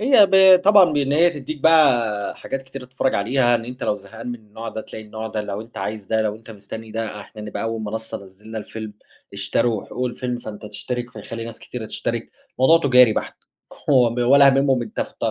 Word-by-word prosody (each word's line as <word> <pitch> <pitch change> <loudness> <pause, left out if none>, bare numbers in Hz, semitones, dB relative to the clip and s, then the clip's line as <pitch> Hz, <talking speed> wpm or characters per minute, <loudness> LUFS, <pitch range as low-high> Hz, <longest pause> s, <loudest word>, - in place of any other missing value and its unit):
هي 225 -3 +6
ب 190 -1 +7
طبعًا 200 -5 +6
بإن 140 -1 0
هي 170 +3 +5
تديك 150 -1 -7
بقى 120 -11 +3
حاجات 135 0 -5
كتير 130 0 -9
تتفرج 130 +1 -1
عليها، 120 +4 +2
إن 115 -1 -1
أنت 125 +2 -9
لو 105 - 0
زهقان 110 +4 -10
من 120 - -3
النوع 110 +1 -9
ده 110 - -5
تلاقي 110 0 -9
النوع 110 +1 -7
ده، 110 -1 -3
لو 105 0 -5
أنت 115 -1 -10
عايز 105 0 -5
ده، 110 +1 +1
لو 105 -1 -1
أنت 115 +1 -15
مستني 110 +1 -9
ده، 110 -1 -4
إحنا 105 +1 -11
نبقى 105 - -5
أول 115 0 -3
منصة 110 +1 -5
نزّلنا 105 +4 -10
الفيلم، 110 0 -7 0.4
اشتروا 105 +2 0
حقوق 125 0 -3
الفيلم، 125 0 -4
فأنت 105 -2 -9
تشترك، 120 +3 -5
فيخلّي 115 +1 -7
ناس 115 0 -8
كتيرة 115 -3 -7
تشترك، 115 +1 -3 0.3
الموضوع 160 +6 +6
تجاري 125 -3 +7
بحت، - - -4 0.5
هو 125 -5 +5
ب 120 - -5
ولا 140 +3 +6
هاممهم 135 -2 +3
أنت 110 - -6
فت - - -5
115 Hz, 210 wpm, -21 LUFS, 110-130 Hz, 0.5 s, ب